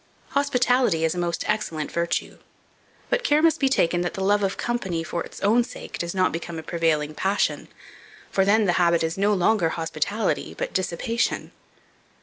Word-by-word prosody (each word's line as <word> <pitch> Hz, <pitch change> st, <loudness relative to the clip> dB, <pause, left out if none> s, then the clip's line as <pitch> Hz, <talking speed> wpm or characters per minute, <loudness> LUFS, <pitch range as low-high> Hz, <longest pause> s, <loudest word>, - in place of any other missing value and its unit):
HOSPITALITY 250 Hz, -, +2 dB
IS 160 Hz, -, +1 dB
A 180 Hz, -, -4 dB
MOST 175 Hz, -1 st, -2 dB
EXCELLENT 190 Hz, -8 st, -2 dB
VIRTUE; 170 Hz, 0 st, -2 dB, 0.7 s
but -, -, +1 dB
care 295 Hz, -7 st, +3 dB
must 330 Hz, -1 st, +4 dB
be 270 Hz, -, +3 dB
taken 175 Hz, -9 st, +2 dB
that 175 Hz, -, -3 dB
the 195 Hz, -, -3 dB
love 205 Hz, +1 st, +3 dB
of 195 Hz, -1 st, -1 dB
company, 190 Hz, -9 st, -2 dB
for 170 Hz, 0 st, -3 dB
its -, -, -11 dB
own 225 Hz, +5 st, +4 dB
sake, 240 Hz, -, -9 dB
does 170 Hz, +2 st, -3 dB
not 185 Hz, -1 st, +2 dB
become 165 Hz, 0 st, -5 dB
a 160 Hz, -, -6 dB
prevailing 155 Hz, -3 st, 0 dB
passion; 195 Hz, +6 st, 0 dB, 0.6 s
for 195 Hz, -, +3 dB
then 210 Hz, +2 st, +3 dB
the 175 Hz, -, +2 dB
habit 170 Hz, -1 st, +3 dB
is 160 Hz, +1 st, -1 dB
no 200 Hz, +2 st, +2 dB
longer 195 Hz, -2 st, +2 dB
hospitality, 165 Hz, +6 st, -2 dB
but -, -, -3 dB
dissipation. 190 Hz, +6 st, -1 dB
185 Hz, 175 wpm, -24 LUFS, 170-220 Hz, 0.7 s, must